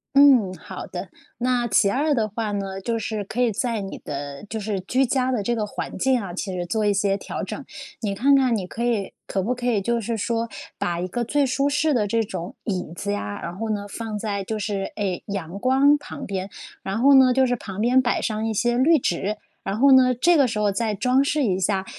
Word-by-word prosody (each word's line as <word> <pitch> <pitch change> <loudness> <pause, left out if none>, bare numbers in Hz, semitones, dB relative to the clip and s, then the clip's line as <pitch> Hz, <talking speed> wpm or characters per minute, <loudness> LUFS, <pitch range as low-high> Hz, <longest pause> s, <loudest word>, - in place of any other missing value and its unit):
嗯， 270 -9 +6
好 - - -8
的。 - - -6 0.3
那 245 0 +1
其 200 -1 +3
2 290 +6 +1
的 220 -3 +1
话 215 +1 -3
呢， 195 -1 -4
就 230 +3 -1
是 215 -1 -3
可 220 +5 -3
以 240 -2 +3
在 230 +1 -1
你 195 - -6
的 140 -1 -6
就 220 - -3
是 205 -2 -2
居 255 +8 +1
家 260 +1 +1
的 235 -5 0
这 240 +4 0
个 215 -2 -2
环 - - -5
境 265 -2 +3
啊， 195 -5 -6
其 190 +2 -4
实 175 -1 -3
做 215 +5 -1
一 205 - +3
些 200 0 +1
调 200 - -5
整。 - - -5 0.4
你 205 -3 -2
看 275 +7 +4
看 260 -3 +3
你 195 -4 -2
可 225 +6 -5
以 230 -5 0
可 190 - -1
不 235 +6 0
可 245 0 -4
以 220 -5 +2
就 235 +3 0
是 225 +1 -2
说 230 +2 -1 0.3
把 170 -1 -1
一 180 - -2
个 240 +6 -2
最 285 +4 +1
舒 275 +2 +1
适 295 +2 +2
的 215 -5 +1
这 225 +2 +1
种 195 -4 -6
椅 180 -6 -3
子 100 - -3
呀， 100 0 -4
然 170 +1 -5
后 225 +3 -4
呢， 205 -1 -2
放 220 +1 -5
在 205 -2 -2
就 220 +3 -3
是， 200 -2 -3
哎， 195 -4 -2
阳 195 -2 -5
光 270 +4 +4
旁 - - -8
边， 190 0 -4 0.3
然 195 +3 -3
后 280 +3 +6
呢， 260 -1 +7
就 260 +1 +4
是 245 -1 +1
旁 200 -4 -8
边 245 +4 +4
摆 245 - 0
上 220 0 -1
一 - - 0
些 240 +3 +1
绿 315 +5 +5
植， 205 - -1 0.3
然 195 +2 -2
后 275 +2 +6
呢， 255 -1 +6
这 340 +9 +4
个 275 -3 +5
时 225 -2 -3
候 210 -1 +2
再 215 +1 -1
装 250 +6 +3
饰 290 +1 +1
一 190 -6 +1
下， 190 0 0
220 Hz, 255 characters per minute, -23 LUFS, 195-250 Hz, 0.4 s, 呢